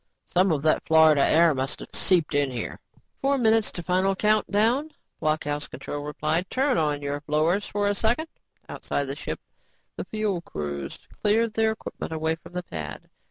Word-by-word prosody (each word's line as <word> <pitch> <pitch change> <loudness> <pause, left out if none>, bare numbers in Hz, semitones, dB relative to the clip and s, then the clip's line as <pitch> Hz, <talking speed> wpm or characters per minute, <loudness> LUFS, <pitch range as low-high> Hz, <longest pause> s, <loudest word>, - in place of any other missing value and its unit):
"Some 185 +1 +2
of 145 -3 0
that 155 - +3
Florida 160 -3 +5
air 165 0 +5
must 135 0 -2
have - - -11
seeped 175 -5 +2
in 145 -1 +2
here." 120 -3 -5 0.4
"Four 275 +1 +2
minutes 225 -3 +3
to 175 - -5
final 185 +3 +2
countdown," 215 +7 +2 0.3
blockhouse 150 -1 -1
control 145 - -6
replied. 155 +4 -1
"Turn 265 0 +1
on 150 -2 0
your 145 0 -3
blowers 155 +7 +1
for 205 0 0
a 205 - +2
second." 235 +10 0 0.4
Outside 145 - -3
the 135 0 -4
ship, - - -5 0.6
the - - -4
fuel 215 -5 -2
crews 70 - -5 0.2
cleared 220 +1 +2
their 220 0 +2
equipment 220 - -7
away 160 0 0
from 165 +2 -12
the 180 0 -3
pad. 80 - -7
170 Hz, 170 wpm, -26 LUFS, 150-210 Hz, 0.6 s, Florida